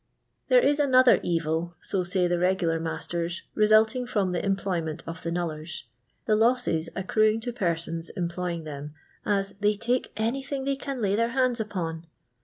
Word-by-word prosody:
There - - +5
is 290 +1 +3
another 255 -3 +6
evil, 165 0 -1
so 190 - -2
say 180 0 +1
the 175 0 0
regular 180 -2 +1
masten, 170 +1 -3 0.2
resulting 220 +4 +4
from 200 -6 0
the 180 - -2
employment 185 -5 -1
of 165 0 -7
the 165 - -3
knullers 160 -3 -4 0.2
— - - -45
the 215 - +3
losses 220 -8 +2
accruing 215 +3 +2
to 245 +1 -4
persons 165 -5 -2
employ 175 0 -3
ing 165 -1 -5
them, 150 0 -7 0.3
as 195 -1 +1
" - - -32
they 210 0 +3
take 240 +4 -1
anything 265 +5 -2
they 275 0 +1
can 270 -3 -5
lay 200 0 +2
their 230 +2 +1
hands 255 -2 +2
upon." 170 -6 -4
195 Hz, 175 wpm, -27 LUFS, 170-230 Hz, 0.3 s, another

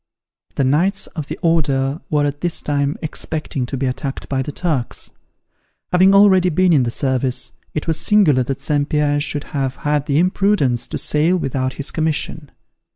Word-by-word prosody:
The - - +1
Knights 170 +9 +1
of 155 -4 -4
the - - -5
Order 140 -3 +1
were 150 -1 +2
at 145 0 -3
this 175 -1 -1
time 145 0 0
expecting 150 -4 -4
to 135 - -4
be 135 - -1
attacked 135 +1 -4
by 135 -1 -1
the 140 - -4
Turks. 145 -6 -3 0.8
Having 190 +2 +5
already 190 -3 +6
been 180 +1 +3
in 145 - +5
the 120 - 0
service, 130 0 -1 0.2
it 150 - -2
was 160 -1 -1
singular 185 -11 +4
that 130 +1 -3
St. 145 -1 0
Pierre 150 -2 +1
should 145 0 -1
have 135 -2 -1
had 150 -1 +1
the 140 - +1
imprudence 180 - +1
to - - -4
sail 160 +5 +2
without 130 -4 -2
his 140 - -5
commission. 155 -1 -2
145 Hz, 175 wpm, -19 LUFS, 135-165 Hz, 0.8 s, already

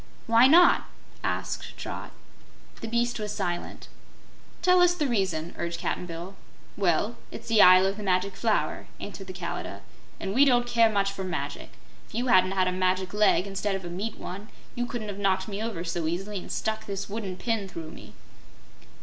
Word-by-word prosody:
"Why 230 +1 +6
not?" 345 +5 +6 0.4
asked - - -3
Trot. - - -6 0.7
The 225 - -4
beast 235 +1 0
was 210 -1 -3
silent. 175 -4 -4 0.8
"Tell 365 0 +5
us 355 0 +5
the 305 - 0
reason," 190 - -1
urged 170 0 -3
Cap'n 180 - -2
Bill. 170 +3 -7 0.4
"Well, 200 +4 +1
it's - - -10
the 225 -2 +5
Isle 185 +1 +8
of 195 +1 -1
the - - -6
Magic 190 0 0
Flower," 225 -2 0
answered 195 -1 -8
the - - -5
Kalidah, 170 - -5 0.4
"and 195 - -3
we 265 +5 +6
don't 245 -3 +4
care 230 -2 +4
much 200 -2 +1
for 195 -1 -5
magic. 160 -6 -5 0.3
If - - -13
you 245 +2 0
hadn't 185 -2 +5
had 185 -1 +2
a - - +1
magic 185 0 0
leg, 210 -2 +4
instead 195 0 -2
of 190 -2 -5
a - - -5
meat 205 +5 -4
one, 200 +4 -7 0.3
you 245 0 -2
couldn't 225 -3 -5
have 200 0 -6
knocked 190 -1 +1
me 205 0 -4
over 220 -7 -3
so 165 -1 -2
easily 195 +5 -3
and - - -8
stuck 220 0 -2
this 200 0 -4
wooden 200 -3 -5
pin 225 -3 -1
through 165 -3 -7
me." - - -12
195 Hz, 190 wpm, -27 LUFS, 185-225 Hz, 0.8 s, Isle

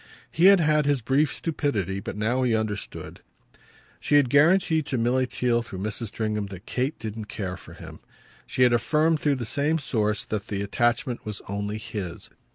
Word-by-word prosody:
He 170 - +2
had 195 0 +8
had 150 -2 +2
his 140 -5 +1
brief 135 +4 +2
stupidity, 105 - -2
but 100 - -6
now 115 +5 0
he 120 -3 +2
understood. 110 -2 -4 0.8
She 145 - +1
had 140 -4 +4
guaranteed 160 0 +4
to 130 - -1
Milly 125 +2 +1
Theale 120 -1 +1
through 105 -5 -8
Mrs. 110 +4 -4
Stringham 105 -1 -2
that 95 +1 -10
Kate 130 +5 -2
didn't 110 -1 -6
care 95 -3 -5
for - - -13
him. - - -11 0.5
She 130 - +1
had 125 -1 +5
affirmed 150 +7 +2
through 145 -2 +1
the 125 -3 -4
same 145 +7 0
source 110 -8 -1
that 105 -2 -4
the 100 -1 -3
attachment 120 +3 0
was 105 -2 -5
only 100 +1 -3
his. 105 -6 -6
120 Hz, 180 wpm, -25 LUFS, 105-145 Hz, 0.8 s, had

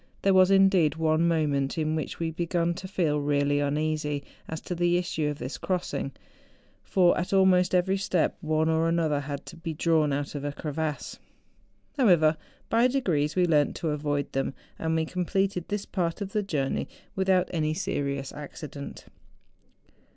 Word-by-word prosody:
There 195 - +4
was, 185 0 +6
indeed, 195 -5 +4
one 160 +1 +2
mo¬ 160 -2 +2
ment 140 0 -1
in 155 -1 0
which 155 -3 -3
we 165 -1 -2
began 170 +1 0
to 185 +2 -7
feel 160 -6 0
really 145 0 +1
uneasy 150 0 -1 0.3
as 160 - -4
to - - -4
the 175 0 +2
issue 160 -4 -1
of 145 - -4
this 130 -1 -6
crossing; 175 -7 -2 0.7
for 180 -2 +3
at 180 +2 -3
almost 185 -1 +4
every 190 +2 +2
step 190 -3 0
one 155 0 +1
or 160 +1 +2
another 160 -3 +1
had 145 0 -5
to 170 - -10
be 165 -1 -5
drawn 155 -2 +2
out 140 +1 -2
of 145 -1 -5
a 145 0 -3
crevasse. 150 0 -4 0.8
However, 170 - +5 0.3
by 230 +2 +4
degrees, 170 - 0
we 180 - +4
learnt 150 -4 +2
to 165 - -2
avoid 145 -1 -1
them, 135 0 -2 0.2
and 160 0 0
we 160 0 +1
completed 180 +1 -1
this 205 -1 -3
part 170 -2 -2
of 200 -1 -4
the 210 - +1
journey 150 -9 -1 0.3
without 190 -1 +2
any 155 -2 0
serious 140 -7 -2
accident. 145 0 -8
160 Hz, 170 wpm, -27 LUFS, 150-180 Hz, 0.8 s, was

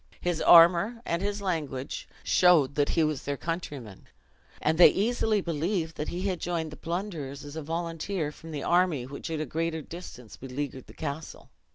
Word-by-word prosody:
His 175 -2 -1
armor, 175 +7 +7
and 170 +1 -1
his 205 0 -2
language, 150 -8 -3
showed 170 -7 +4
he 165 - +2
was 155 -3 0
their 140 0 -3
countryman; 145 - -6 0.5
and 160 +2 0
they 175 - +11
easily 220 0 +1
believed 165 0 -2
that 150 - -3
he 180 +2 -4
had 190 -3 -1
joined 165 -3 -2
the - - -8
plunderers 165 -6 -5
as 145 +1 -9
a 160 - -4
volunteer 165 +1 -3
from 165 +2 -12
the 145 -3 -4
army, 175 -7 +2
which 140 +4 -7
at 160 -1 -2
a 155 - -1
greater 160 +2 -2
distance 140 -10 -10
beleaguered 135 0 -5
the - - -14
castle. 150 0 -6
165 Hz, 175 wpm, -28 LUFS, 145-175 Hz, 0.5 s, they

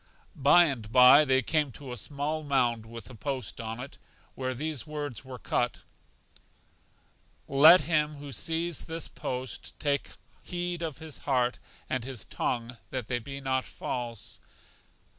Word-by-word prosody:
By 160 +6 +6
and 120 -8 -3
by 130 +4 +8
they 130 -1 +3
came 150 +1 +1
to 135 0 -8
a - - -4
small 145 +6 -2
mound 120 -6 +1
with 115 0 -9
a - - -11
post 130 +1 -4
on 115 +1 -5
it, 130 +2 -8 0.3
where 130 -1 -3
these 155 +2 -3
words 145 -6 -5
were 130 -1 -8
cut, 120 0 -1 1.7
Let 155 +6 +8
him 150 0 +1
who 145 -1 -9
sees 165 +5 -1
this 165 -1 -2
post 130 0 -5
take 140 -2 0 0.3
heed 175 -1 -4
of 160 -5 -3
his 160 -2 -7
heart 125 -2 +2 0.3
and 130 -3 -1
his 130 -2 -5
tongue 120 0 -3
that 125 -4 -4
they 120 -1 +1
be 135 +4 -7
not 130 -1 0
false. 120 -4 -5
135 Hz, 150 wpm, -29 LUFS, 125-150 Hz, 1.7 s, by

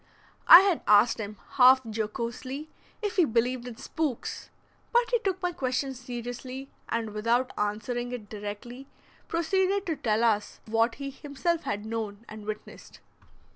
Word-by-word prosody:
I 340 - +12
had 385 -4 +1
asked 210 +3 +5
him, 210 -1 -5 0.2
half 260 0 +8
jocosely, 235 +6 -4 0.3
if 410 -1 -2
he 360 - +6
believed 245 0 0
in 235 -2 -8
"spooks"; 305 -5 -3 0.4
but 480 0 +3
he 480 - +3
took 385 -4 -1
my 360 - +1
question 265 -4 -2
seriously, 250 +2 -7 0.2
and 230 -2 -2
without 230 +4 +1
answering 240 +4 -2
it 235 -4 -6
directly, 210 +6 -7 0.4
proceeded 380 +4 +1
to 325 - -1
tell 225 -5 0
us 210 -3 +1
what 225 +1 +1
he 275 0 -5
himself 295 +5 -2
had 205 +1 -3
known 220 -1 -4
and 215 -1 -10
witnessed. 215 0 -8
245 Hz, 145 wpm, -28 LUFS, 220-290 Hz, 0.4 s, I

